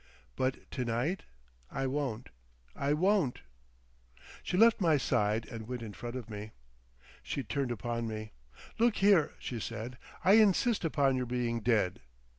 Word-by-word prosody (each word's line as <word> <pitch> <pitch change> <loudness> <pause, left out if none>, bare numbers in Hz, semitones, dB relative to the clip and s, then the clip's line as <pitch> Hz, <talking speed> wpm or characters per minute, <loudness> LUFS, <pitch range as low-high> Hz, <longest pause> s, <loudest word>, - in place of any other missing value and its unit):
But 130 0 -1
to 130 - -2
night—I 115 - -4
won't—I 115 - -4
won't." 180 -4 +2 1.0
She 180 - -2
left 225 0 +6
my 160 -4 +4
side 115 -4 +1
and 110 -2 -8
went 125 -1 -4
in 105 -2 -7
front 120 +7 -6
of 125 -4 -5
me. 105 0 -7 0.7
She 140 - -3
turned 140 -2 -2
upon 115 0 -2
me. 110 -1 -5 0.5
"Look 235 -1 +4
here," 195 -5 +4
she 120 - -5
said, 115 +3 -6 0.3
"I 195 +3 +7
insist 215 +2 +3
upon 140 -5 +2
your 125 -1 -2
being 120 -1 -1
dead. 105 -5 +1
125 Hz, 140 wpm, -31 LUFS, 110-150 Hz, 1.0 s, I